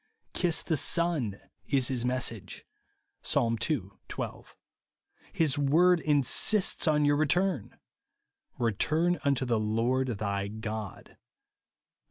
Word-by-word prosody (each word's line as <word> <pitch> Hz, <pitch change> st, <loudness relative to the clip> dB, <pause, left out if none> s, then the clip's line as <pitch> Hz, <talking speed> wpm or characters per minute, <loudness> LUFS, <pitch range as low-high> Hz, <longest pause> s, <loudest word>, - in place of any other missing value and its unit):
" -, -, -47 dB
Kiss 175 Hz, -3 st, 0 dB
the 160 Hz, -, 0 dB
Son 145 Hz, -, +1 dB
" -, -, -51 dB
is 135 Hz, -3 st, +2 dB
his 125 Hz, -3 st, -1 dB
message, 125 Hz, -4 st, -3 dB, 0.6 s
(Psa. 115 Hz, -1 st, +1 dB
ii. 150 Hz, -7 st, +1 dB, 0.3 s
12). -, -, -7 dB, 0.8 s
His 150 Hz, -3 st, +1 dB
word 170 Hz, +5 st, +4 dB
in 145 Hz, -3 st, +2 dB
sists 185 Hz, -, +2 dB
on 150 Hz, -1 st, +2 dB
your 145 Hz, 0 st, +3 dB
return, 155 Hz, -, 0 dB, 0.3 s
— -, -, -56 dB
" -, -, -45 dB
Keturn 155 Hz, -, +1 dB
unto 140 Hz, -2 st, +1 dB
the 115 Hz, -3 st, +1 dB
Lord 115 Hz, +5 st, 0 dB
thy 100 Hz, -1 st, -2 dB
God," 110 Hz, -1 st, -6 dB
(Hos. -, -, -24 dB
135 Hz, 135 wpm, -29 LUFS, 115-160 Hz, 0.8 s, word